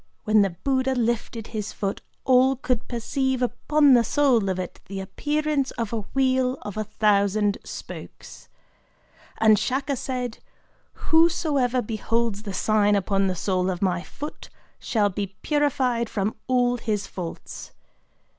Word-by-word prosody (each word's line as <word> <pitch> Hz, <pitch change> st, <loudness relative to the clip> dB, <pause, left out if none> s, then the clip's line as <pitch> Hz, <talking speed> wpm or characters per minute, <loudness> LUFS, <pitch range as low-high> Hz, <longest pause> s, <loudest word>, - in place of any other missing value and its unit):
When 215 Hz, 0 st, +4 dB
the 195 Hz, -, +3 dB
Buddha 260 Hz, +8 st, 0 dB
lifted 230 Hz, -1 st, -1 dB
up -, -, -18 dB
his 215 Hz, -1 st, -3 dB
foot 200 Hz, -1 st, -3 dB, 0.2 s
all 260 Hz, +1 st, +5 dB
could 250 Hz, -2 st, -2 dB
perceive 260 Hz, +2 st, -1 dB
upon 285 Hz, +4 st, +3 dB
the 240 Hz, -2 st, +6 dB
sole 240 Hz, -5 st, +2 dB
of 185 Hz, -, -1 dB
it 185 Hz, -1 st, -6 dB
the 195 Hz, 0 st, -5 dB
appearance 295 Hz, +8 st, -1 dB
of 230 Hz, -1 st, -3 dB
a 230 Hz, -, 0 dB, 0.2 s
wheel 260 Hz, -1 st, +2 dB
of 205 Hz, -2 st, -6 dB
a 215 Hz, -, -1 dB
thousand 205 Hz, -1 st, +2 dB
spokes…. -, -, -10 dB, 0.9 s
And 215 Hz, -2 st, +5 dB
Shaka 275 Hz, +2 st, -1 dB
said: 250 Hz, -2 st, -4 dB, 0.7 s
'Whosoever 300 Hz, -7 st, +3 dB
beholds 225 Hz, 0 st, -1 dB
the 210 Hz, -2 st, -6 dB
sign 210 Hz, 0 st, +3 dB
upon 195 Hz, 0 st, +1 dB
the 185 Hz, -, -1 dB
sole 185 Hz, +1 st, 0 dB
of 180 Hz, 0 st, -2 dB
my 180 Hz, -2 st, +1 dB
foot 295 Hz, -, -8 dB, 0.3 s
shall 210 Hz, -3 st, +1 dB
be 195 Hz, 0 st, -4 dB
purified 260 Hz, -6 st, +1 dB
from 205 Hz, +1 st, -1 dB
all 245 Hz, -1 st, +2 dB
his 215 Hz, -3 st, -2 dB
faults. 175 Hz, -3 st, -7 dB
230 Hz, 145 wpm, -24 LUFS, 205-260 Hz, 0.9 s, the